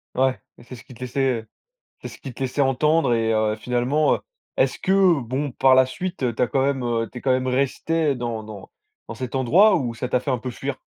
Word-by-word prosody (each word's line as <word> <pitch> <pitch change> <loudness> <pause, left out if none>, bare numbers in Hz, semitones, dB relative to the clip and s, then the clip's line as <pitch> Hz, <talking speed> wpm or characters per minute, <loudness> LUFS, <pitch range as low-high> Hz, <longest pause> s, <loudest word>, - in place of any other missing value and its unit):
Ouais, 130 0 +1 0.2
c'est 125 +1 -10
ce 115 - -13
qu'ils 125 - -14
te - - -18
laissaient, 125 -2 0
heu, 110 - -21 0.6
c'est - - -6
ce - - -12
qu'ils 130 -4 -9
te - - -14
laissaient 130 +2 -2
entendre 140 0 +2
et 115 -1 +1
heu, 110 -1 +1
finalement, 125 +6 +1
heu, - - -11 0.4
est-ce - - +1
que 190 -5 +3
bon, 130 +3 -3
par 130 0 +4
la 130 -1 +5
suite, 130 -5 -3
tu - - -1
as - - +4
quand 135 +1 +1
même, 135 -2 0
heu, 115 -2 -1
tu 125 - -7
es - - -10
quand 135 - -1
même 130 0 +1
restée 140 +3 0
dans 115 -2 -4
dans 105 -2 -10 0.4
dans - - -7
cet 130 0 -5
endroit 175 - +5
ou 120 -6 -2
ça 125 +2 -4
t'a 125 - +2
fait 135 +1 -2
un 125 - 0
peu 125 +3 -5
fuir? 135 +2 -5
130 Hz, 250 wpm, -23 LUFS, 120-140 Hz, 0.6 s, la